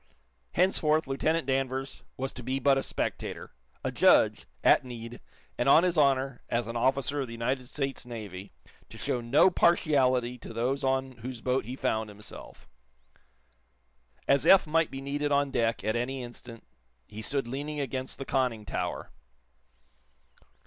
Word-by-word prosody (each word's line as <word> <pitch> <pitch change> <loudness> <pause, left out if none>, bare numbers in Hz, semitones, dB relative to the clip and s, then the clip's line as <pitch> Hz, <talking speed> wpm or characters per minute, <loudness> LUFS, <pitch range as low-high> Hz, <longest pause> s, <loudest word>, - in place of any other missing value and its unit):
Henceforth, 160 -3 +2
Lieutenant 155 +3 0
Danvers 135 0 -2 0.2
was 135 +1 -3
to 125 - -8
be 130 +2 -2
but 135 +1 +4
a 135 - +1
spectator - - -4 0.3
a - - -1
judge, - - +4 0.2
at - - +5
need, 120 -2 -8 0.4
and 120 - +2
on 160 - +7
his 180 -1 +1
honor, 135 -3 +2
as 120 0 0
an 115 +2 -6
officer 135 +4 +1
of 135 - -3
the 115 - -8
United 125 +2 -2
States 135 -2 -3
Navy, 105 -6 -8 0.4
to - - -11
show 125 - -2
no 135 +10 +4
partiality 130 -8 +2
to - - -9
those 130 +4 -1
on 130 -1 -1
whose 120 0 -7
boat 125 -2 0
he 125 +3 -5
found 110 -4 -1
himself. 105 0 -12 1.6
As 140 0 +4
Eph 195 - +7
might 160 +1 +1
be 135 - -7
needed 145 +1 -2
on 140 -1 +2
deck, 115 -1 0
at 110 - 0
any 125 +2 -2
instant, 120 -1 -10 0.4
he 110 +1 -8
stood 135 +2 -1
leaning 145 +4 -4
against 130 -1 -3
the 135 - -6
conning 125 -6 0
tower. 85 - -4
130 Hz, 155 wpm, -29 LUFS, 120-140 Hz, 1.6 s, on